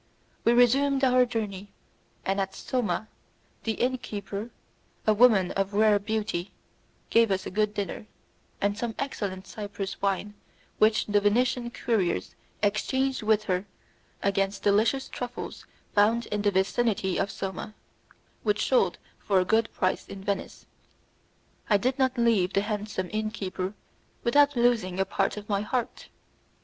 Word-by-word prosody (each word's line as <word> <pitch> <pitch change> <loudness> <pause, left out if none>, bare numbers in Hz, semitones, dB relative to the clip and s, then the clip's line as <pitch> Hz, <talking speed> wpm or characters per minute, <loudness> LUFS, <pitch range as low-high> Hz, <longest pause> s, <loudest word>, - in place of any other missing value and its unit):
We 235 - +4
resumed 270 +3 +4
our 255 -1 +5
journey, 205 -4 -4 0.5
and 195 +1 +1
at 195 0 -3
Soma, 215 -5 -2 0.6
the 225 - +1
inn 255 +3 0
keeper, 205 0 -5 0.6
a 215 - +5
woman 210 -5 +5
of 195 +1 -1
rare 210 -1 +5
beauty, 205 -3 -2 0.6
gave 230 -1 +5
us 190 -1 0
a - - -5
good 210 +1 0
dinner, 205 +2 -4 0.5
and 200 0 +1
some 225 0 -3
excellent 200 -9 -4
Cyprus 200 -1 -6
wine 200 +1 -1 0.5
which 215 0 +4
the 205 -1 +2
Venetian 240 +3 +2
couriers 220 -7 -1 0.3
exchanged 260 +6 +1
with 215 -1 +2
her 185 0 -1 0.6
against 195 0 0
delicious 220 +6 +2
truffles 245 0 -6 0.3
found 220 +3 +3
in 210 0 0
the 205 - +3
vicinity 195 0 +1
of 200 - 0
Soma, 195 +2 -5 0.7
which 210 -1 +1
sold 195 -9 +3 0.2
for 195 -2 +2
a 185 - +1
good 225 +3 +2
price 185 -1 -1
in 195 -1 -9
Venice. 200 -1 -3 1.0
I 210 - +6
did 255 +6 -1
not 260 -1 +2
leave 220 -6 +3
the 195 - +3
handsome 210 -3 -3
inn 215 0 0
keeper 195 -2 -4 0.5
without 285 +4 +4
losing 230 -7 +2
a 195 - +3
part 200 - -1
of 210 0 -7
my 200 -1 0
heart. 240 +3 -3
210 Hz, 145 wpm, -27 LUFS, 195-235 Hz, 1.0 s, I